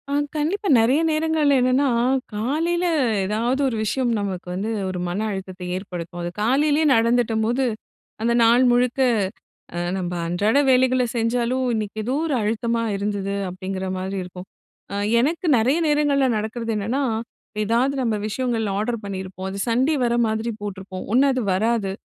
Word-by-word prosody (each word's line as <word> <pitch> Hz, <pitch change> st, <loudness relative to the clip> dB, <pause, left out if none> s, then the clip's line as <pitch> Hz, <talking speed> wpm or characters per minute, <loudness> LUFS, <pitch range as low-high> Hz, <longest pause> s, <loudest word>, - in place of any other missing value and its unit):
ஆ -, -, -2 dB, 0.2 s
கண்டிப்பா 355 Hz, +8 st, -1 dB
நெறைய 240 Hz, +6 st, +4 dB
நேரங்கள்ல 310 Hz, -2 st, +2 dB
என்னன்னா, 255 Hz, +3 st, +3 dB, 0.5 s
காலையில 325 Hz, +11 st, 0 dB, 0.4 s
எதாவது 235 Hz, +7 st, 0 dB
ஒரு 250 Hz, -, -1 dB
விஷயம் 240 Hz, +3 st, 0 dB
நமக்கு 190 Hz, -3 st, -4 dB
வந்து 195 Hz, +4 st, -3 dB, 0.2 s
ஒரு 185 Hz, -1 st, -4 dB
மன 175 Hz, +3 st, -2 dB
அழுத்தத்தை 185 Hz, -2 st, -6 dB
ஏற்படுத்தும். 175 Hz, -2 st, -6 dB
அது 175 Hz, -, -3 dB
காலையிலேயே 290 Hz, +7 st, +2 dB
நடந்துட்டம்போது, 230 Hz, +1 st, +2 dB, 0.6 s
"அந்த 235 Hz, +1 st, +2 dB
நாள் 235 Hz, +3 st, +5 dB
முழுக்க 245 Hz, +1 st, +1 dB, 0.8 s
அ -, -, -2 dB, 0.2 s
நம்ப 180 Hz, -2 st, -3 dB
அன்றாட 205 Hz, +9 st, +1 dB
வேலைகள 255 Hz, 0 st, +4 dB
செஞ்சாலும், 240 Hz, +2 st, 0 dB
இன்னைக்கு 215 Hz, -1 st, -3 dB
எதோ 250 Hz, +4 st, -1 dB
ஒரு 305 Hz, -, 0 dB
அழுத்தமா 230 Hz, +2 st, 0 dB
இருந்தது."அப்படீங்கிற 195 Hz, -2 st, -3 dB
மாரி 190 Hz, +1 st, -4 dB
இருக்கும். 180 Hz, +1 st, -10 dB, 0.5 s
அ -, -, -2 dB, 0.2 s
எனக்கு 325 Hz, +8 st, 0 dB
நெறைய 260 Hz, +8 st, +2 dB
நேரங்கள்ல 290 Hz, -2 st, +2 dB
நடக்கிறது 225 Hz, +2 st, -3 dB
என்னன்னா, 230 Hz, +7 st, -1 dB, 0.6 s
"எதாவது 240 Hz, +6 st, +1 dB
நம்ப 225 Hz, -3 st, 0 dB
விஷயங்கள் 230 Hz, -1 st, -1 dB
ஆர்டர் 230 Hz, +1 st, -2 dB
பண்ணியிருப்போம். 190 Hz, -1 st, -5 dB
அது 200 Hz, +1 st, -5 dB
சண்டே 255 Hz, +7 st, +2 dB
வர 235 Hz, 0 st, +1 dB
மாதிரி 220 Hz, +1 st, -2 dB
போட்டிருப்போம். 190 Hz, -2 st, -6 dB
ஒண்ணு 265 Hz, +3 st, +5 dB
அது 255 Hz, -3 st, -1 dB
வராது, 215 Hz, 0 st, 0 dB
230 Hz, 140 wpm, -22 LUFS, 200-260 Hz, 0.8 s, நாள்